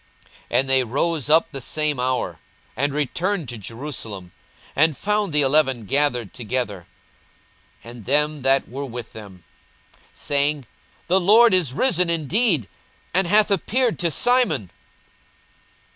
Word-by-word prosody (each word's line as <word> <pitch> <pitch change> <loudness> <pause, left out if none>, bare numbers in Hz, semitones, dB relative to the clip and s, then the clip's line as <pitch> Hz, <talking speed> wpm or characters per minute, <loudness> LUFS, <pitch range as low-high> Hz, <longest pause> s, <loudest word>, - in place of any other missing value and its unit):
42:024:033 120 - +2
And 135 0 -1
they 130 -1 +4
rose 145 +5 -1
up 160 +2 +3
the 135 -3 -6
same 150 +1 -1
hour, 125 -10 -2 0.4
and 140 +2 -1
returned 165 +5 -2
to 120 - -6
Jerusalem, 110 -5 -7 0.4
and 155 0 +2
found 210 -2 -1
the 150 -1 +2
eleven 135 -4 +2
gathered 125 -4 +1
together, 110 -6 -4 1.0
and 115 -2 -12
them 150 +2 +1
that 135 +1 +2
were 140 +3 -6
with 120 -2 -8
them, 100 -5 -12 0.5
42:024:034 - - -22
Saying, 145 -1 +1 0.4
The 185 +2 +3
Lord 215 +4 +5
is 170 -9 +2
risen 180 - +1
indeed, 165 - +1 0.5
and 185 0 +3
hath 210 +3 +3
appeared 235 +4 0
to 170 - 0
Simon. 165 - +1
145 Hz, 135 wpm, -22 LUFS, 125-170 Hz, 1.0 s, Lord